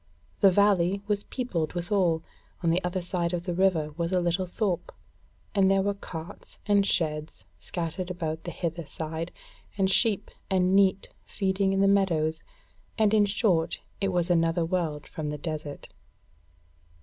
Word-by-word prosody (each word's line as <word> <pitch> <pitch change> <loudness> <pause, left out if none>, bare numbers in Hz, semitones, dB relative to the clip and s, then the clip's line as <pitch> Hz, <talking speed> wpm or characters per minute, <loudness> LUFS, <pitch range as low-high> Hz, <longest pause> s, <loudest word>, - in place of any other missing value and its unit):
The 195 - +7
valley 195 0 +3
was 205 -1 0
peopled 185 - -2
withal: 175 -2 +1 0.4
on 165 - +3
the 180 +3 +1
other 180 +1 -2
side 175 -1 -1
of 175 -1 -1
the 175 -1 -2
river 170 -4 +2
was 170 0 -1
a 185 - +3
little 175 +1 0
thorp, 180 -2 -2 0.6
and 195 -2 +4
there 195 0 +3
were 200 +1 +1
carts 180 -2 -9
and 205 -1 +4
sheds 155 - -1
scattered 175 - -4
about 160 -3 -3
the - - -5
hither 170 -1 -4
side, 160 +2 -4 0.5
and 190 -1 +2
sheep 215 0 +2 0.2
and 185 0 +3
neat 195 -1 +3
feeding 195 -1 0
in 195 0 +2
the 195 - +5
meadows, 165 -6 +2 0.6
and 215 -1 +3
in 210 -1 +5
short 185 -5 +1 0.2
it 195 -1 +1
was 175 0 +1
another 165 0 +2
world 165 -4 -2
from 155 -2 -5
the 150 - -3
desert. 150 -2 -5
180 Hz, 160 wpm, -27 LUFS, 165-195 Hz, 0.6 s, The